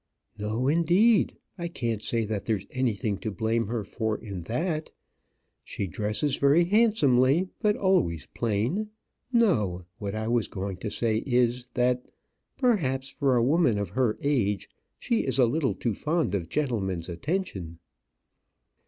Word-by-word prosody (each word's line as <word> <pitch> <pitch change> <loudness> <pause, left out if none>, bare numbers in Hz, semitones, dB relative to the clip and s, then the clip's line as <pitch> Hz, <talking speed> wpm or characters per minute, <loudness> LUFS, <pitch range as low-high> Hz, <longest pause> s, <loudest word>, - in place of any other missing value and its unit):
"No, 110 +5 -2
indeed. 175 +9 +3 0.2
I 170 - -2
can't 115 -9 -3
say 115 0 0
that 105 -1 -3
there's 105 -4 -1
anything 110 -5 -1
to 110 - -3
blame 110 +2 0
her 115 -1 -2
for 110 +1 -2
in 100 -5 -7
that. 155 - -2 0.7
She 100 - -4
dresses 105 - -1
very 140 +5 +5
handsomely, 175 - +3
but 210 -2 +2
always 135 - +1
plain. 120 - -1 0.4
No; 105 - +2
what 100 0 -4
I 110 0 -3
was 120 -2 +1
going 95 -1 -5
to 105 - -4
say 110 0 0
is, 125 0 +1
that 125 0 +2 0.5
perhaps 135 - +1
for 135 -3 +1
a 120 - +3
woman 135 -4 +3
of 100 -3 -2
her 120 +2 0
age 105 -9 0 0.3
she 235 - 0
is 130 -1 0
a 130 - +6
little 135 +3 0
too 115 - -1
fond 155 - -1
of 90 -5 -2
gentlemen's 100 - -1
attention." 90 - -3
120 Hz, 145 wpm, -27 LUFS, 105-155 Hz, 0.7 s, a